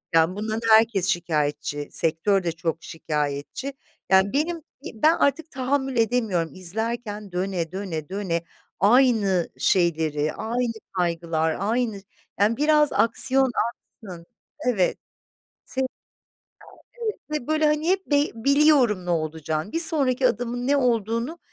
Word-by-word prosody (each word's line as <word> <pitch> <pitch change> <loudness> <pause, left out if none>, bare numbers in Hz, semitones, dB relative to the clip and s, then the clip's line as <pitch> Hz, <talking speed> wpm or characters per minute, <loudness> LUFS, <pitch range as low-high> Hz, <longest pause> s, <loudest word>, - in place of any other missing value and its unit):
Yani 165 +3 +3
bundan 220 +2 -3
da - - -6
herkes 220 -4 +4
şikâyetçi, 150 -4 -1
sektör 175 +4 +1
de 170 - -1
çok 165 -1 -3
şikâyetçi. 150 - -4 0.4
Yani 190 +3 +4
benim 325 +3 -1 0.3
ben 305 +9 +3
artık 325 0 0
tahammül 265 0 -1
edemiyorum 220 -8 +1
izlerken 210 +2 -3
döne, 180 -2 -2
döne, 180 -5 -5
döne, 185 -4 -2 0.4
aynı 210 -6 +3
şeyleri, 160 -4 +1
aynı 235 +2 -2 0.2
kaygılar, 165 -3 -1
aynı 220 0 -1 0.4
Yani 215 +3 +2
biraz 300 0 +3
aksiyon 260 +3 +3 0.2
aksın 185 -7 -13 0.4
Evet. 195 -7 +1 0.7
S 265 - -5
Ya, 260 - +1 1.2
evet, 430 -2 -1 0.3
ve 240 - -15
böyle, 310 0 +2
hani, 300 +3 +1
hep 380 0 +1
be 290 - +2 0.2
biliyorum 270 -6 +3
ne - - -5
olacağını. 160 +1 -2
Bir 330 - -1
sonraki 270 -6 +3
adımın 245 +1 -3
ne 285 0 +3
olduğunu 235 - 0
210 Hz, 125 wpm, -24 LUFS, 170-260 Hz, 1.2 s, herkes